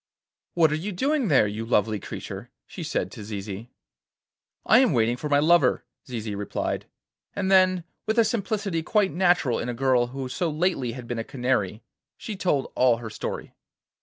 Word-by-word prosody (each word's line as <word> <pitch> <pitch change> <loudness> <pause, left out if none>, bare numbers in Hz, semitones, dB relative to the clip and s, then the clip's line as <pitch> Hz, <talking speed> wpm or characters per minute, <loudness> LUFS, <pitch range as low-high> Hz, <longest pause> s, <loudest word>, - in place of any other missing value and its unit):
'What 165 -3 +4
are 155 +1 -1
you 205 +4 -3
doing 270 +6 0
there, 140 - +5
you 105 +2 -3
lovely 110 -2 +1
creature?' - - -7 0.2
she - - -9
said 90 - -2
to 110 - -9
Zizi. 105 +1 -6 1.0
'I 225 - +6
am 255 - +4
waiting 120 -1 +2
for 150 +4 -5
my 145 - +4
lover,' 155 -3 +4 0.2
Zizi 115 -4 -4
replied; 100 0 -3 0.5
and 195 -1 -1
then, 185 -2 +5 0.2
with 220 +2 0
a 230 - +6
simplicity 205 -5 -1
quite 195 +3 +2
natural 175 -8 +2
in 120 - -3
a 120 - -3
girl 125 -1 +2
who 130 +1 -5
so 165 +7 -1
lately 150 -6 0
had 125 -1 -8
been 120 -1 -4
a - - -2
canary, 120 -5 -1 0.3
she 215 - -6
told 150 -8 0
all 125 -2 +4
her 115 -2 -7
story. - - -5
135 Hz, 180 wpm, -25 LUFS, 115-185 Hz, 1.0 s, I